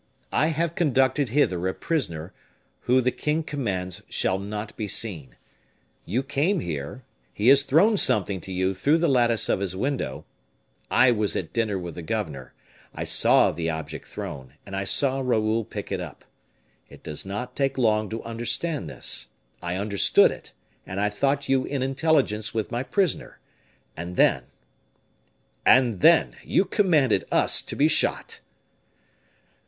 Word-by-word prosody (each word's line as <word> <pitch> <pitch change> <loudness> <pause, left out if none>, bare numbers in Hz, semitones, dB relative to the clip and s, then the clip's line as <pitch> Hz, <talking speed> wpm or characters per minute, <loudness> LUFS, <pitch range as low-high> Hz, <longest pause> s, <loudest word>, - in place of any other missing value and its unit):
"I 155 - +3
have 165 +1 -1
conducted 135 -4 +1
hither 95 -9 +1
a 95 - -2
prisoner, 85 - -3 0.5
who 130 +1 +4
the 125 +1 +1
king 150 +4 -1
commands 95 - -4
shall 95 +1 0
not 105 +2 -6
be 110 - -4
seen. 85 - -3 0.7
You 120 +9 -1
came 150 +8 0
here, 85 - -5 0.3
he 110 +4 +2
has 140 0 +7
thrown 165 +11 +3
something 100 - +2
to 95 - -8
you 95 +1 0
through 140 - +2
the 170 +1 +1
lattice 120 -4 +2
of - - +1
his 95 -2 -3
window; 95 - -3 0.6
I 125 0 +5
was 105 -3 0
at 85 - -4
dinner 110 -4 0
with 90 -2 -6
the 85 - -7
governor, 80 - -4 0.4
I - - -4
saw - - +4
the 80 +1 -3
object 80 -1 -6
thrown, 65 0 -8
and 95 - -7
I 95 0 -2
saw 135 +6 +2
Raoul 115 -3 +1
pick - - -8
it - - -1
up. - - -10 0.6
It - - -15
does 75 - -3
not 125 +6 -6
take 135 -1 -1
long 110 -4 +1
to 115 +1 -5
understand 120 +7 -3
this. - - -1 0.3
I 85 +1 -3
understood 100 +1 +3
it, - - -10 0.3
and 95 +1 -6
I 105 +1 +1
thought 140 +6 0
you 135 -1 +2
in 140 -2 -2
intelligence 135 -6 0
with 110 -2 -2
my 120 - -1
prisoner. 180 +3 -1 0.6
And 85 +2 -6
then 65 -7 +3 0.6
" - - -42 0.2
"And 125 -6 +4
then 165 0 +4
you 195 - +2
commanded 170 - +2
us - - +3
to - - -5
be - - +3
shot." - - 0
115 Hz, 160 wpm, -25 LUFS, 95-135 Hz, 0.7 s, has